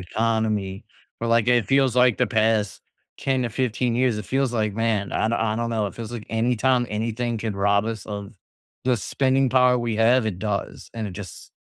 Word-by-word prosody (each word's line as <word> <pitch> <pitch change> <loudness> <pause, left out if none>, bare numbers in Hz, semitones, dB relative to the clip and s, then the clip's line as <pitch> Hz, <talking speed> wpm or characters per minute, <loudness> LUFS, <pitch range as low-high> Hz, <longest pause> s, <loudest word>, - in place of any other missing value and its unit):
economy, 110 0 -1 0.4
or 115 - -2
like, 115 +1 +3
it 120 -2 +3
feels, 135 -2 +3
like, 125 -2 +5
the - - +3
past 110 -2 +1 0.4
10 130 -2 0
to 120 - -2
15 120 0 -1
years, 125 -3 +2
it 105 - -6
feels 135 +1 0
like 105 -3 -1
"Man, 110 -3 0
I - - +1
I 110 -1 0
don't 115 0 -2
know.", 110 -2 0
it 100 - -7
feels, 115 0 -7
like, 115 -3 -7
anytime 120 +2 +1
anything 115 +2 -2
could 105 -2 -4
rob 100 +1 +2
us 110 -3 -5
of 100 0 -6 0.5
the 125 -1 +2
spending 130 +5 +1
power 125 -1 +4
we 115 -2 -2
have, 115 +1 +4
it 95 -4 -3
does, 105 -1 -4
and 110 -2 -3
it 95 - -8
just 95 -1 -10
115 Hz, 200 wpm, -23 LUFS, 105-125 Hz, 0.5 s, like